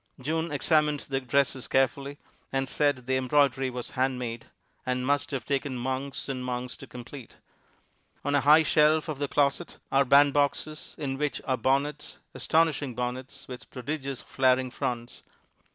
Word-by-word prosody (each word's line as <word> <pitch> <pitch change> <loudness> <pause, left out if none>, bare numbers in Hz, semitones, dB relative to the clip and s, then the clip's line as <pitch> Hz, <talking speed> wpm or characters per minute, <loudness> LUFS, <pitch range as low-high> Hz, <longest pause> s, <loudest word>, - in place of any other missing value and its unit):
June 160 +4 -2
examined 150 0 +2
the 135 -1 -2
dresses 130 0 0
carefully, 135 +2 +1 0.3
and 135 0 0
said 140 -2 +1
the 130 0 +1
embroidery 135 0 +2
was 125 -1 -6
handmade, 125 -3 -2 0.4
and 125 0 -1
must 145 +1 +1
have 135 -5 -4
taken 140 -2 -1
months 130 +2 -3
and 130 -2 -3
months 125 0 -3
to - - -11
complete. 125 +1 -10 0.9
On 145 - +1
a 145 - +4
high 150 +4 +7
shelf 155 +1 +3
of 150 -3 -4
the 145 - 0
closet 145 +4 0
are 135 +1 +5
bandboxes, 145 +2 +2
in 135 -3 -3
which 150 -4 -1
are 130 - +1
bonnets, 140 +4 -1 0.2
astonishing 155 -5 +1
bonnets, 125 +3 -5
with 125 -1 -9
prodigious 135 0 -4
flaring 130 -1 +2
fronts. 120 -3 -4
135 Hz, 150 wpm, -28 LUFS, 125-145 Hz, 0.9 s, high